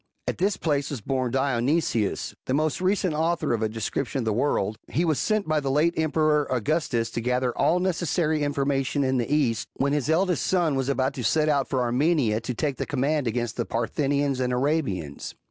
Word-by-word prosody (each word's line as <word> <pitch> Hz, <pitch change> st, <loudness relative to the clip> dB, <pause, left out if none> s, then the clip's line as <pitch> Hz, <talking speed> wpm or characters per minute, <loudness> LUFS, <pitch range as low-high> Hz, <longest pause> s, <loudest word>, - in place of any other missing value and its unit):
At -, -, -2 dB
this 195 Hz, +2 st, +1 dB
place 145 Hz, -4 st, 0 dB
was 140 Hz, -, -4 dB
born 130 Hz, +3 st, -1 dB
Dionysius,* 130 Hz, -2 st, 0 dB
the 130 Hz, -, +1 dB
most 155 Hz, +3 st, 0 dB
recent 185 Hz, -2 st, +1 dB
author 160 Hz, -2 st, 0 dB
of 115 Hz, -, -1 dB
a 110 Hz, -, +1 dB
description 115 Hz, +5 st, -3 dB
of 125 Hz, -, -1 dB
the 110 Hz, -, +1 dB
world; 110 Hz, -4 st, 0 dB
he 170 Hz, -, 0 dB
was 155 Hz, -4 st, +1 dB
sent 215 Hz, -4 st, 0 dB
by 155 Hz, -1 st, +2 dB
the 140 Hz, -2 st, -2 dB
late 150 Hz, +5 st, +2 dB
emperor 155 Hz, -2 st, +1 dB
Augustus 125 Hz, -3 st, 0 dB
to 120 Hz, -, -3 dB
gather 125 Hz, +1 st, 0 dB
all 175 Hz, -, +2 dB
necessary 170 Hz, -3 st, 0 dB
information 140 Hz, -1 st, 0 dB
in 130 Hz, -1 st, +1 dB
the 120 Hz, +3 st, -2 dB
East, 130 Hz, -7 st, +1 dB
when 140 Hz, +1 st, 0 dB
his 145 Hz, -4 st, 0 dB
eldest^ 175 Hz, +2 st, +2 dB
son 175 Hz, -3 st, +1 dB
was 135 Hz, 0 st, -1 dB
about 135 Hz, 0 st, 0 dB
to 130 Hz, -, -5 dB
set 155 Hz, +6 st, +2 dB
out 140 Hz, -3 st, +1 dB
for 130 Hz, -2 st, 0 dB
Armenia 125 Hz, -3 st, +1 dB
to 125 Hz, +2 st, -3 dB
take 140 Hz, +2 st, -1 dB
the -, -, -3 dB
command 145 Hz, 0 st, 0 dB
against 120 Hz, 0 st, -2 dB
the 120 Hz, -, 0 dB
Parthians 140 Hz, +3 st, 0 dB
and 125 Hz, -1 st, 0 dB
Arabians. 125 Hz, -, -2 dB
140 Hz, 200 wpm, -25 LUFS, 125-155 Hz, -, by